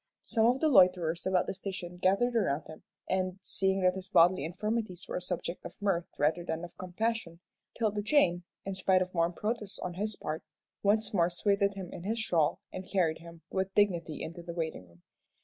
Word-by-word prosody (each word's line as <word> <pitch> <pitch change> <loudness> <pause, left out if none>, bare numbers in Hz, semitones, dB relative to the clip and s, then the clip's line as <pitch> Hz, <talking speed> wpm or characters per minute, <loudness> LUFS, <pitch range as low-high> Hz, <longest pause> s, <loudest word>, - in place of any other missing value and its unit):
Some 225 -1 +3
of 250 +2 +3
the 315 - +4
loiterers 180 - +4
about 185 -1 +3
the - - -3
station 185 -2 -6
gathered 200 +7 +2
around 155 -9 +1
him, 155 - -11 0.3
and 185 0 0
seeing 190 0 0
that 185 0 +4
his 190 0 -7
bodily 175 -3 +5
infirmities 190 +2 -3
were - - -3
a - - -4
subject 180 -1 -4
of - - -9
mirth 190 -4 0
rather 155 +4 +2
than 165 0 -3
of 175 - -8
compassion, 185 -1 -2 0.4
'Tilda 215 -2 0
Jane, 205 - +3 0.2
in 195 - -2
spite 185 0 +3
of 185 - -10
warm 170 0 +2
protests 210 0 -3
on 180 - -4
his 210 +4 -2
part, 155 +1 -4 0.4
once 215 +2 +2
more 175 -3 +3
swathed 200 +2 +1
him 185 -3 -7
in - - -7
his 215 +6 -2
shawl, 170 -9 +1
and 185 0 -7
carried 170 -5 +2
him 170 0 -13
with 190 0 -2
dignity 175 -6 +1
into 170 +2 -6
the 170 0 -7
waiting 160 - -3
room. 85 0 -23
185 Hz, 200 wpm, -31 LUFS, 170-200 Hz, 0.4 s, bodily